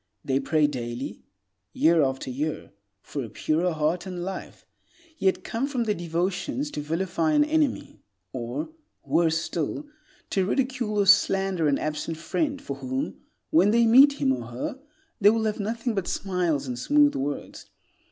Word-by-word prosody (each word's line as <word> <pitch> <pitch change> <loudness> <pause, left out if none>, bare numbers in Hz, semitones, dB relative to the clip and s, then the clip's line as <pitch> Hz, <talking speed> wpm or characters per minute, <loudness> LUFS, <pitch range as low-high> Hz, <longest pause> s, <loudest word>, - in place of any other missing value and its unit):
They 135 0 +1
pray 155 +1 +2
daily, 120 -4 -4 0.5
year 165 0 +4
after 135 -1 -1
year, 150 +4 -3 0.3
for 140 - -4
a 115 - -7
purer 160 - 0
heart 160 +3 -1
and 180 -2 -5
life, 190 +1 -7 0.5
yet 190 -1 +1
come 240 +5 -2
from 260 -4 -1
their 215 -2 +1
devotions 180 - -2
to - - -4
vilify 180 - 0
an 295 0 +5
enemy, 305 -3 0 0.3
or, 125 - -4 0.4
worse 165 -1 +2
still, 165 - -3 0.5
to 190 - +2
ridicule 250 0 -1
or 200 - +3
slander 195 -3 +4
an 140 -1 +2
absent 155 +1 -3
friend 280 - -1
for 140 - -6
whom, 130 0 -4 0.3
when 180 +6 +5
they 230 +2 +4
meet 265 +5 +7
him 135 - +1
or 120 -3 -5
her, 120 - -5 0.4
they 205 -1 +7
will 225 +1 +1
have 215 -1 -1
nothing 225 +3 -2
but 195 -4 -2
smiles 175 -7 -1
and 125 -2 -4
smooth 290 - +4
words. 140 +1 -4
180 Hz, 160 wpm, -26 LUFS, 150-225 Hz, 0.5 s, meet